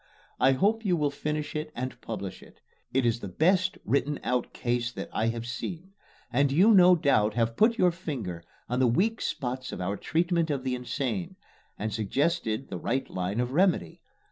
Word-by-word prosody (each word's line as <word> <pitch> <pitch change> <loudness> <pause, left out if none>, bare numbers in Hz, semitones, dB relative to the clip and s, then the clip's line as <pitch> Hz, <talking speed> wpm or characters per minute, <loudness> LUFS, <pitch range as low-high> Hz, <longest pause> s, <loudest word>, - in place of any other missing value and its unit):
I 135 +2 +5
hope 210 +11 +1
you 180 -5 +2
will 145 -2 +1
finish 150 +1 -3
it 155 0 -3
and 130 +1 -5
publish - - -6
it. - - -17 0.3
It 130 -1 +1
is 115 0 +1
the 100 - -6
best 185 - +2
written 140 +1 0
out 125 -1 -1
"case" 120 0 -1
that - - -6
I 110 - +1
have 115 0 -2
seen; 170 +10 -6 0.4
and 140 +2 +3
you 190 +10 +6
no 180 -2 +8
doubt 110 -9 +2
have 115 -1 +1
put 230 - +4
your 180 -5 +4
finger 130 - -5 0.2
on 125 +1 -1
the 130 - +4
weak 210 - +1
spots 130 0 -3
of - - -6
our 100 +3 -2
treatment 170 0 0
of 140 -3 -1
the 130 -1 -1
insane, 125 -5 -3 0.4
and 110 0 -3
suggested 130 - 0
the 90 - -5
right 130 +8 -1
line 90 +4 -2
of 125 0 -1
remedy. 160 - +1
135 Hz, 190 wpm, -28 LUFS, 115-170 Hz, 0.4 s, no